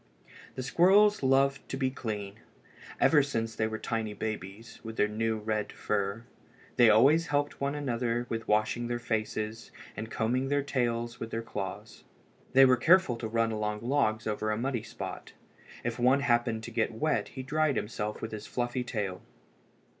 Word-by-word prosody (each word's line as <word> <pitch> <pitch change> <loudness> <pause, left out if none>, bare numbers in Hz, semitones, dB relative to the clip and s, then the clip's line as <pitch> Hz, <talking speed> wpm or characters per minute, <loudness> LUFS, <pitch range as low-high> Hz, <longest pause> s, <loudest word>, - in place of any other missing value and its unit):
The 130 - -4
squirrels 195 +9 +5
loved 135 +1 +2
to 135 - -3
be 130 -1 0
clean. 105 -5 -5 0.6
Ever 150 -2 +5
since 115 -5 -2
they 110 0 0
were 110 0 -4
tiny 110 -2 -3
babies, 110 +1 -6
with 115 -1 -7
their 105 - +3
new 110 +1 -1
red 105 0 -2
fur, 100 +1 -2 0.5
they 120 -2 +6
always 140 +10 +5
helped 145 -1 -1
one 140 +1 0
another 120 -4 -1
with 115 -1 -4
washing 110 +3 +1
their 120 0 -1
faces, 110 -1 -3 0.3
and 110 +1 -5
combing 125 +4 0
their 145 0 +1
tails 120 -3 -1
with 115 - -5
their 115 0 -3
claws. 105 0 -6 0.5
They 135 +1 +8
were 130 -1 +5
careful 175 0 +4
to 115 - -4
run 115 0 +1
along 105 -1 -2
logs 115 -4 +1
over 110 0 -1
a 105 - 0
muddy 125 0 -1
spot. 110 - -8 0.5
If 120 0 -3
one 130 +3 +4
happened 120 -3 +1
to 120 - -7
get 115 0 0
wet 155 +6 0
he 130 - -7
dried 150 +1 +1
himself 105 0 -3
with 110 - -4
his 105 -1 -7
fluffy 120 0 -2
tail. 105 -6 -3
115 Hz, 170 wpm, -29 LUFS, 110-135 Hz, 0.6 s, They